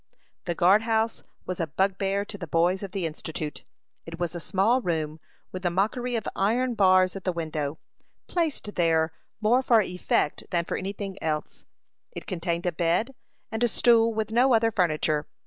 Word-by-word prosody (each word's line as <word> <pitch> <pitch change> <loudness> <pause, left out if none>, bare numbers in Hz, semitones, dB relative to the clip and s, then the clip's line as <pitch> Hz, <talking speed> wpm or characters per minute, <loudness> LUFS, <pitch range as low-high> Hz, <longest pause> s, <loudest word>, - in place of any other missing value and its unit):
The 175 - -2
guard 190 +5 +5
house 225 0 0 0.2
was 185 - -4
a 165 - 0
bugbear 195 +4 0
to 205 - -8
the 185 -4 -7
boys 175 +4 +2
of 200 -2 -6
the 190 -3 -2
Institute. 155 -1 -5 0.4
It 165 0 -8
was 175 -1 -2
a 175 - -4
small 205 +9 +2
room, 160 -5 -2 0.3
with 185 - -6
the 180 - +1
mockery 220 +7 0
of 225 - -2
iron 240 +6 +1
bars 185 -3 +4
at 195 - -6
the 185 - 0
window, 155 -3 -3 0.5
placed 315 - -2
there 160 -2 +2 0.3
more 235 +4 +4
for 240 -3 +4
effect 180 -6 0
than 170 -1 0
for - - -3
any 190 +1 -3
thing 195 -1 -6
else. 155 -1 -3 0.5
It - - -7
contained 170 -2 -2
a 180 - +2
bed 175 +9 0 0.4
and 220 +1 -1
a - - +5
stool, 230 0 +4
with 220 -1 -2
no 245 +2 +4
other 225 0 +3
furniture. 155 -6 +1
185 Hz, 180 wpm, -26 LUFS, 170-220 Hz, 0.5 s, guard